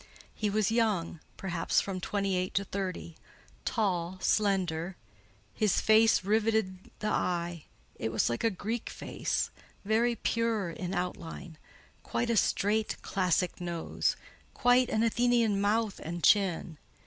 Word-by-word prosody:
He 210 - -1
was 215 +1 +1
young—perhaps 185 -5 0
from 190 -2 -3
twenty 200 -1 -1
eight 185 0 -2
to 200 - +2
thirty—tall, 185 0 -4
slender; 185 -4 0 0.6
his 210 - +2
face 220 -2 +5
riveted 210 -2 0
the 215 - -2
eye; 175 -4 -1 0.3
it 110 - -2
was 110 - +1
like 120 - -2
a 230 - +4
Greek 220 +4 -4
face, - - -2 0.3
very 230 +3 +2
pure 225 -5 0
in 180 +2 -4
outline: 175 -2 -5 0.4
quite 240 -1 -1
a - - +2
straight, 210 +2 +1
classic 180 -1 0
nose; 170 -2 -1 0.4
quite 245 +1 +4
an 220 - +1
Athenian 230 -3 +2
mouth 210 +1 +1
and 170 +1 -6
chin. 180 -6 +3
195 Hz, 125 wpm, -30 LUFS, 175-220 Hz, 0.6 s, face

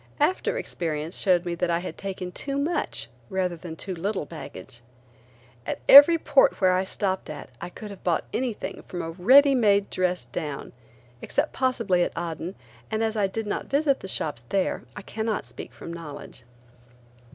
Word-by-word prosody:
After 370 +10 +1
experience 165 - -3
showed 180 -2 +3
me 175 - -2
that 170 +1 -1
I 170 - +2
had 180 +2 -5
taken 185 -2 -5
too 275 +8 -3
much 305 +4 -1 0.2
rather 185 -2 -1
than 165 -1 -8
too 190 +3 -5
little 190 0 -2
baggage. 145 -6 -10 0.8
At - - -3
every 290 +5 +11
port 290 -3 +3
where 185 -2 +4
I 185 +1 +2
stopped 190 -2 -2
at 145 -3 -8
I 175 - -5
could 210 +3 -9
have 195 - -11
bought 170 -3 +1
anything 245 -4 -3
from 175 - -4
a 165 - -4
ready 260 - +6
made 205 -5 +3
dress 180 -1 0
down, 145 -3 -5 0.5
except 295 +2 -1
possibly 230 -9 +1
at - - -1
Aden, 170 +2 -4 0.3
and 220 +1 0
as 220 0 0
I 205 -2 +2
did 220 +3 -4
not 205 - -3
visit 280 -1 +2
the - - -8
shops 150 -9 -2
there 195 -2 0
I - - -8
cannot 220 +1 -2
speak - - -7
from 170 - -9
knowledge. 150 -6 -9
190 Hz, 175 wpm, -26 LUFS, 170-225 Hz, 0.8 s, every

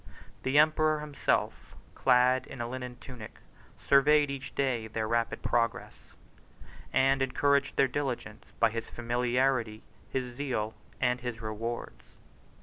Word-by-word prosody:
The 130 +2 +1
emperor 155 0 +4
himself, 150 -2 -1 0.2
clad 125 0 +3
in 135 - -9
a 120 - -2
linen 125 0 -6
tunic, 120 -4 -10 0.4
surveyed 145 +1 +4
each 135 -1 -7
day 125 -5 0
their 110 0 -3
rapid 115 +1 -1
progress, 115 0 -2 0.8
and 135 0 +3
encouraged 140 +1 +2
their 135 - +5
diligence 125 -6 -4
by 115 -1 +4
his 115 0 -5
familiarity, 120 -1 0 0.3
his 125 -2 -3
zeal, 120 -6 -2 0.3
and 125 -1 +1
his 120 -2 -4
rewards. 115 +2 -5
125 Hz, 125 wpm, -30 LUFS, 115-135 Hz, 0.8 s, their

